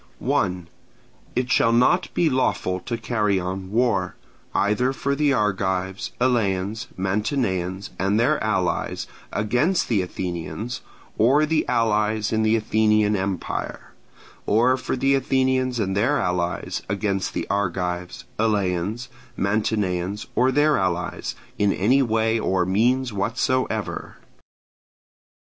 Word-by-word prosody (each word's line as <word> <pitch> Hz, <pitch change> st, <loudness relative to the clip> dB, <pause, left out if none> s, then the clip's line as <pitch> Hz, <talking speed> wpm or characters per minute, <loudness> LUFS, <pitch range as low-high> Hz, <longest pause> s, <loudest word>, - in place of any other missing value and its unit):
1. 90 Hz, -3 st, -1 dB, 0.7 s
It 125 Hz, 0 st, 0 dB
shall 115 Hz, -, +4 dB
not 125 Hz, +10 st, +3 dB
be 170 Hz, -, +3 dB
lawful 125 Hz, -9 st, 0 dB
to 115 Hz, +5 st, -4 dB
carry 105 Hz, -4 st, 0 dB
on 95 Hz, +1 st, -4 dB
war, 110 Hz, -5 st, +1 dB, 0.4 s
either 115 Hz, +6 st, +2 dB
for 140 Hz, +1 st, -1 dB
the 145 Hz, 0 st, +2 dB
Argives, 95 Hz, -4 st, -1 dB
Eleans, 110 Hz, -3 st, 0 dB
Mantineans, 95 Hz, -2 st, -1 dB
and 100 Hz, +3 st, +2 dB
their 140 Hz, +4 st, +2 dB
allies, 95 Hz, -4 st, -1 dB, 0.3 s
against 125 Hz, -, +1 dB
the 110 Hz, -5 st, +2 dB
Athenians, 90 Hz, +6 st, -4 dB, 0.4 s
or 135 Hz, +7 st, +5 dB
the 155 Hz, 0 st, 0 dB
allies 110 Hz, -3 st, +1 dB
in 110 Hz, -, +2 dB
the 110 Hz, +1 st, +3 dB
Athenian 110 Hz, -1 st, +2 dB
empire: 95 Hz, -2 st, -4 dB, 0.6 s
or 120 Hz, +5 st, +4 dB
for 130 Hz, -, -3 dB
the 135 Hz, +2 st, +2 dB
Athenians 130 Hz, -1 st, +1 dB
and 95 Hz, -3 st, -1 dB
their 120 Hz, +9 st, +2 dB
allies 90 Hz, -4 st, -1 dB
against 100 Hz, -1 st, -1 dB
the -, -, -1 dB
Argives, 90 Hz, -2 st, -2 dB
Eleans, 105 Hz, +1 st, 0 dB, 0.3 s
Mantineans, 100 Hz, -1 st, -1 dB
or 130 Hz, +1 st, +3 dB
their 145 Hz, 0 st, +3 dB
allies, 90 Hz, -1 st, -2 dB, 0.2 s
in 105 Hz, -1 st, +3 dB
any 125 Hz, +10 st, +3 dB
way 115 Hz, -2 st, +1 dB
or 95 Hz, -4 st, +1 dB
means 120 Hz, +6 st, +1 dB
whatsoever. 115 Hz, +1 st, -1 dB
105 Hz, 120 wpm, -23 LUFS, 95-125 Hz, 0.7 s, or